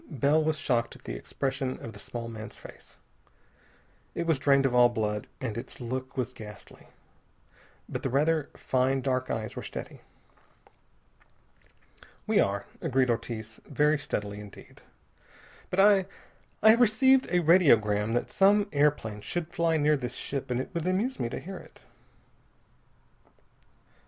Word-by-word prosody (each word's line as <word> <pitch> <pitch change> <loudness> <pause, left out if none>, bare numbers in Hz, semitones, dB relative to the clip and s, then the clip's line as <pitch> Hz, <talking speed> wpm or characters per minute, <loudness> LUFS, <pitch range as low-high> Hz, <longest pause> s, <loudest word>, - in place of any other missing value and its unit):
Bell 150 +1 +2
was 155 0 0
shocked 120 -5 0
at - - -17
the - - -5
expression 130 - -3
on 115 - -8
the 100 - -12
small 115 +2 -6
man's 110 -2 -8
face. - - -14 1.2
It 170 - -2
was 165 -5 +1
drained 140 -1 +4
of 130 - +1
all 125 0 +6
blood, 105 -3 -2
and 120 -5 -4
its 120 +2 -7
look 130 +2 -5
was 125 - -2
ghastly. 105 -2 -12 1.0
But - - -5
the 135 - -2
rather 150 +3 +1
fine 130 +1 +1
dark 130 0 -1
eyes 110 -1 -3
were - - -5
steady. - - -8 2.2
"We - - +2
are," 100 0 +1 0.2
agreed 130 -6 +2
Ortiz, 115 -1 -5
very 150 +2 +2
steadily 105 -8 -4
indeed, 105 -1 -13 0.9
"but 180 - -2
I 195 -1 +5 0.6
I 220 - +9
have 230 +2 +3
received 260 +4 +4
a 180 0 +2
radiogram 115 - +4
that 120 - -1
some 200 +1 +4
airplane 140 -8 +1
should 170 +7 -4
fly 165 -1 +2
near 150 0 +3
this 125 -2 -5
ship, 135 -1 -4
and 125 0 0
it 130 - -5
would 170 0 -2
amuse 220 +8 0
me 115 - -1
to - - -5
hear 190 +2 -8
it." - - -15
135 Hz, 150 wpm, -28 LUFS, 115-165 Hz, 2.2 s, I